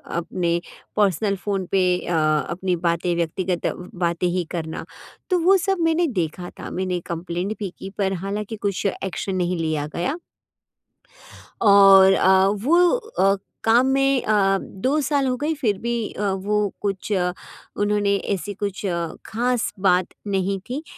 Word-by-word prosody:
अपने 170 Hz, 0 st, -1 dB, 0.4 s
personal 200 Hz, 0 st, +2 dB
phone 195 Hz, -1 st, -2 dB
पे 195 Hz, -1 st, +3 dB, 0.3 s
अ, 175 Hz, -, -1 dB, 0.4 s
अपनी 180 Hz, +1 st, -1 dB
बातें 170 Hz, 0 st, 0 dB
व्यक्तिगत 170 Hz, +1 st, -2 dB, 0.3 s
बातें 175 Hz, 0 st, 0 dB
ही 175 Hz, 0 st, 0 dB
करना। 160 Hz, -2 st, -4 dB, 0.4 s
तो 365 Hz, -2 st, +2 dB
वो 370 Hz, +4 st, +5 dB
सब 385 Hz, +2 st, 0 dB
मैंने 330 Hz, +1 st, +2 dB
देखा 175 Hz, -, -3 dB
था, -, -, -6 dB
मैंने 180 Hz, -1 st, -2 dB
कम्प्लेंट 175 Hz, +4 st, -3 dB
भी 200 Hz, -3 st, -3 dB
की 195 Hz, -, -6 dB
पर 195 Hz, -1 st, 0 dB
हालाँकि 210 Hz, +2 st, -3 dB
कुछ 200 Hz, -1 st, -3 dB, 0.2 s
एक्शन 190 Hz, 0 st, -3 dB
नहीं 180 Hz, 0 st, 0 dB
लिया 155 Hz, -2 st, -1 dB
गया। 270 Hz, -, -1 dB, 1.4 s
और 195 Hz, -2 st, +7 dB
अ, 190 Hz, 0 st, +4 dB
वो 290 Hz, -, +3 dB
अ, 440 Hz, -, +1 dB, 0.3 s
काम 235 Hz, +3 st, +4 dB
में 270 Hz, -1 st, +3 dB
अ, 195 Hz, -2 st, +3 dB
2 260 Hz, +13 st, -1 dB
साल 280 Hz, -1 st, +1 dB
हो 255 Hz, -, +1 dB
गए 300 Hz, +4 st, -1 dB
फिर 210 Hz, -5 st, +1 dB
भी 235 Hz, 0 st, -2 dB, 0.2 s
अ, 200 Hz, -1 st, -1 dB
वो 205 Hz, +2 st, 0 dB
कुछ 200 Hz, +1 st, -3 dB
उन्होंने 200 Hz, +2 st, -1 dB, 0.2 s
ऐसी 200 Hz, +2 st, -4 dB
कुछ 200 Hz, 0 st, -4 dB, 0.4 s
ख़ास 245 Hz, +1 st, -1 dB
बात 180 Hz, -2 st, +3 dB, 0.2 s
नहीं 195 Hz, 0 st, 0 dB
थी 275 Hz, +5 st, -3 dB
195 Hz, 145 wpm, -22 LUFS, 180-220 Hz, 1.4 s, और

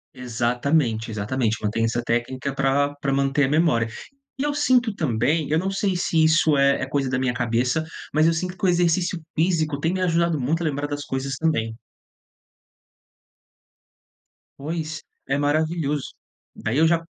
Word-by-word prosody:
Exatamente, 120 Hz, 0 st, 0 dB
exatamente, 110 Hz, +2 st, -1 dB
mantém 115 Hz, +2 st, 0 dB
essa 120 Hz, +1 st, -1 dB
técnica 130 Hz, +4 st, -2 dB
pra 140 Hz, +1 st, +1 dB
pra 140 Hz, -, 0 dB
manter 135 Hz, +1 st, +2 dB
a -, -, 0 dB
memória. 150 Hz, -7 st, +2 dB, 0.5 s
E -, -, -1 dB
eu 290 Hz, 0 st, 0 dB
sinto 250 Hz, -6 st, +2 dB
também 150 Hz, -, 0 dB
eu 155 Hz, -, +3 dB
não 190 Hz, +3 st, -1 dB
sei 195 Hz, 0 st, 0 dB
se 160 Hz, -2 st, +2 dB
isso 160 Hz, -2 st, +4 dB
é 140 Hz, 0 st, +3 dB
é 130 Hz, -, -2 dB
coisa 135 Hz, -2 st, -1 dB
da 130 Hz, -, 0 dB
minha 130 Hz, -2 st, 0 dB
cabeça, 125 Hz, +6 st, 0 dB, 0.3 s
mas 155 Hz, +2 st, +4 dB
eu 165 Hz, -, +4 dB
sinto 180 Hz, +3 st, -3 dB
que -, -, -5 dB
o 185 Hz, -, +4 dB
exercício 175 Hz, 0 st, +1 dB, 0.2 s
físico 160 Hz, -3 st, +1 dB
tem 165 Hz, +4 st, 0 dB
me 190 Hz, -, -2 dB
ajudado 170 Hz, -4 st, +1 dB
muito 160 Hz, +7 st, 0 dB
a -, -, -2 dB
lembrar 145 Hz, -2 st, -1 dB
das 145 Hz, 0 st, -5 dB
coisas 135 Hz, 0 st, -3 dB
também. 115 Hz, -8 st, 0 dB, 2.8 s
Pois, 155 Hz, +1 st, -4 dB, 0.2 s
é 135 Hz, +1 st, +1 dB
maravilhoso. 150 Hz, -1 st, 0 dB, 0.4 s
Daí 115 Hz, +6 st, -2 dB
eu 160 Hz, +1 st, +5 dB
já 165 Hz, 0 st, +2 dB
145 Hz, 165 wpm, -23 LUFS, 130-165 Hz, 2.8 s, eu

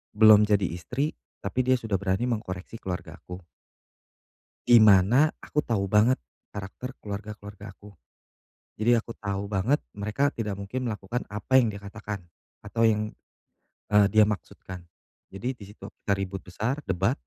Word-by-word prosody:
belum 105 Hz, -1 st, +8 dB
jadi 105 Hz, -2 st, +2 dB
istri 125 Hz, -, -2 dB, 0.3 s
tapi 100 Hz, +6 st, 0 dB
dia 130 Hz, +1 st, +3 dB
sudah 110 Hz, -4 st, -2 dB
berani 95 Hz, +3 st, 0 dB
mengkoreksi 100 Hz, -4 st, -4 dB
keluargaku. 90 Hz, -1 st, -7 dB, 1.2 s
Di 120 Hz, -2 st, +8 dB
mana 110 Hz, +9 st, +6 dB
aku 150 Hz, -, -2 dB
tahu 105 Hz, -8 st, -1 dB
banget 105 Hz, +6 st, +4 dB, 0.3 s
karakter 105 Hz, +6 st, -7 dB
keluarga-keluarga 105 Hz, 0 st, -8 dB
aku, 105 Hz, 0 st, -14 dB, 0.8 s
jadi 115 Hz, +2 st, +3 dB
aku 115 Hz, +1 st, -10 dB
tahu 100 Hz, -1 st, -3 dB
banget 105 Hz, +9 st, +1 dB, 0.2 s
mereka 105 Hz, +8 st, 0 dB
tidak 110 Hz, -6 st, -3 dB
mungkin 125 Hz, +6 st, -4 dB
melakukan 110 Hz, +1 st, -3 dB
apa 105 Hz, +6 st, +1 dB
yang 115 Hz, -4 st, +4 dB
dia 100 Hz, -, -8 dB
katakan, 100 Hz, 0 st, -6 dB, 0.4 s
atau 115 Hz, +3 st, -2 dB
yang, 105 Hz, -1 st, +3 dB, 0.9 s
eee, 105 Hz, -1 st, +7 dB
dia 110 Hz, -1 st, +6 dB
maksudkan 95 Hz, -3 st, -5 dB, 0.5 s
jadi 120 Hz, +7 st, -3 dB
di 115 Hz, -5 st, -13 dB
situ 105 Hz, -, -12 dB, 0.2 s
kita 100 Hz, -, +1 dB
ribut 95 Hz, -1 st, -4 dB
besar, 110 Hz, -, -3 dB
debat, 95 Hz, +6 st, +2 dB
105 Hz, 145 wpm, -27 LUFS, 100-115 Hz, 1.2 s, belum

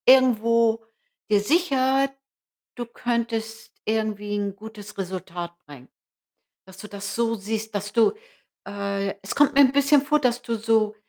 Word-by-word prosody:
Irgendwo 230 Hz, -3 st, +5 dB, 0.5 s
gesichert, 270 Hz, -, +2 dB, 0.6 s
du 240 Hz, -, -4 dB
könntest 230 Hz, -1 st, -3 dB
irgendwie 215 Hz, -1 st, -1 dB
'n 200 Hz, -1 st, -2 dB
gutes 210 Hz, -1 st, -11 dB
Resultat 180 Hz, -2 st, -5 dB
bringen. 135 Hz, -3 st, -13 dB, 0.8 s
Dass 190 Hz, 0 st, -15 dB
du 210 Hz, -, -9 dB
das 200 Hz, -1 st, -6 dB
so 230 Hz, -1 st, +1 dB
siehst, 220 Hz, +1 st, -4 dB
dass 205 Hz, +1 st, -3 dB
du 230 Hz, -2 st, +4 dB, 0.5 s
äh, 200 Hz, -1 st, -2 dB
es 195 Hz, -, -4 dB
kommt 290 Hz, 0 st, +4 dB
mir 285 Hz, -, +7 dB
'n 260 Hz, -2 st, +6 dB
bisschen 280 Hz, +1 st, +4 dB
vor, 300 Hz, +2 st, +2 dB
dass 245 Hz, -3 st, +1 dB
du 235 Hz, -2 st, -2 dB
so 220 Hz, -1 st, +1 dB
220 Hz, 140 wpm, -24 LUFS, 205-245 Hz, 0.8 s, mir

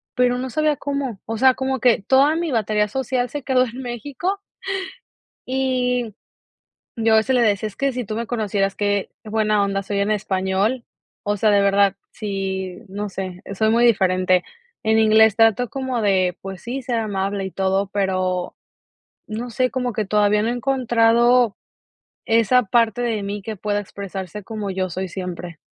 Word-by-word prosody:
pero 250 Hz, 0 st, +2 dB
no 260 Hz, +1 st, -3 dB
sabía 305 Hz, +2 st, +1 dB
cómo, 275 Hz, -7 st, -3 dB
o 225 Hz, 0 st, -3 dB
sea, 260 Hz, +2 st, +5 dB
como 265 Hz, 0 st, -2 dB
que 235 Hz, -3 st, +3 dB
toda 270 Hz, +8 st, +4 dB
mi 340 Hz, -1 st, -1 dB
batería 210 Hz, -2 st, +1 dB
social 250 Hz, +1 st, -1 dB
se 290 Hz, -2 st, -5 dB
quedó 255 Hz, -1 st, +3 dB
en 250 Hz, +2 st, -7 dB
México 285 Hz, -, -3 dB, 1.1 s
y, 250 Hz, -3 st, 0 dB, 0.8 s
yo 225 Hz, -1 st, +3 dB
a -, -, +6 dB
veces 255 Hz, +4 st, +2 dB
le 245 Hz, -, +4 dB
decía: 215 Hz, -1 st, +2 dB
"Es 205 Hz, -, -11 dB
que 275 Hz, 0 st, 0 dB
si 250 Hz, -2 st, -4 dB
tú 215 Hz, -, -4 dB
me 230 Hz, +1 st, -3 dB
conocieras 205 Hz, -4 st, -1 dB
que 205 Hz, -1 st, 0 dB, 0.2 s
buena 215 Hz, -1 st, +1 dB
onda 195 Hz, 0 st, 0 dB
soy 200 Hz, +1 st, -2 dB
en 200 Hz, +2 st, +1 dB
español," 195 Hz, +4 st, 0 dB, 0.4 s
o 205 Hz, 0 st, 0 dB
sea, 215 Hz, +1 st, +2 dB
de 200 Hz, -1 st, +4 dB
verdad 200 Hz, 0 st, +3 dB, 0.2 s
si, 190 Hz, -3 st, -4 dB
no 205 Hz, +2 st, -5 dB
sé, 185 Hz, -2 st, -6 dB
soy 220 Hz, +2 st, +2 dB
muy 235 Hz, +1 st, +3 dB
diferente. 185 Hz, -4 st, +3 dB, 0.4 s
En 220 Hz, 0 st, +3 dB
inglés 220 Hz, -1 st, +5 dB
trato 225 Hz, +2 st, +3 dB
como 260 Hz, -2 st, -3 dB
de 185 Hz, -4 st, +2 dB
pues 190 Hz, -2 st, -7 dB
sí, 255 Hz, +3 st, -4 dB
ser 240 Hz, -2 st, -1 dB
amable 200 Hz, -2 st, -2 dB
y 190 Hz, -, -5 dB
todo, 190 Hz, +1 st, 0 dB
pero 185 Hz, -2 st, -1 dB, 0.7 s
no 230 Hz, +3 st, -5 dB
sé, 255 Hz, +2 st, +1 dB
como 250 Hz, -1 st, -1 dB
que 215 Hz, -1 st, -2 dB
todavía 210 Hz, +1 st, +3 dB
no -, -, 0 dB
he -, -, +1 dB
encontrado 240 Hz, -2 st, +3 dB, 0.7 s
esa 230 Hz, +2 st, +4 dB
parte 230 Hz, +2 st, +2 dB
de 225 Hz, -3 st, -1 dB
mí 200 Hz, 0 st, -4 dB
que 220 Hz, 0 st, -5 dB
pueda 205 Hz, +1 st, -1 dB
expresarse 195 Hz, 0 st, -7 dB
como 210 Hz, -2 st, -4 dB
yo 185 Hz, 0 st, -2 dB
soy 185 Hz, +2 st, -4 dB
siempre. 180 Hz, -2 st, -6 dB
215 Hz, 175 wpm, -21 LUFS, 195-245 Hz, 1.1 s, a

